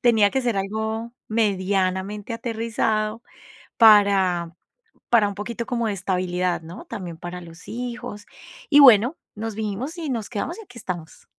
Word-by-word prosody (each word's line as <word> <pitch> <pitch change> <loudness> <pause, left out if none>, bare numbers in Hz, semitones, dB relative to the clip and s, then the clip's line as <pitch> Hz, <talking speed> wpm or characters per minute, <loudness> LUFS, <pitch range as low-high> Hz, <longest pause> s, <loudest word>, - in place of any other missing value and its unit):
tenía 220 -4 +4
que 265 - 0
ser 240 -5 0
algo 220 +4 -3 0.2
medianamente 200 0 0
aterrizado 225 -1 -1 0.5
para 195 -6 +5 0.6
para 225 -4 +5
un 200 - -5
poquito 235 +3 -5
como 235 -2 -1
de 205 - -1
estabilidad, 180 -2 -1
¿no? 175 +7 -10
También 180 -7 -7
para 175 +1 -7
los 165 0 -13
hijos, 240 -3 -6 0.5
y 290 - +8
bueno, 250 +2 +7 0.2
nos 220 +1 -4
vinimos 220 - -4
y 310 -4 -4
nos 230 -5 -2
quedamos 250 - -4
y - - -8
aquí 245 -10 -13
estamos. 170 -4 -7
215 Hz, 150 wpm, -23 LUFS, 190-235 Hz, 0.6 s, y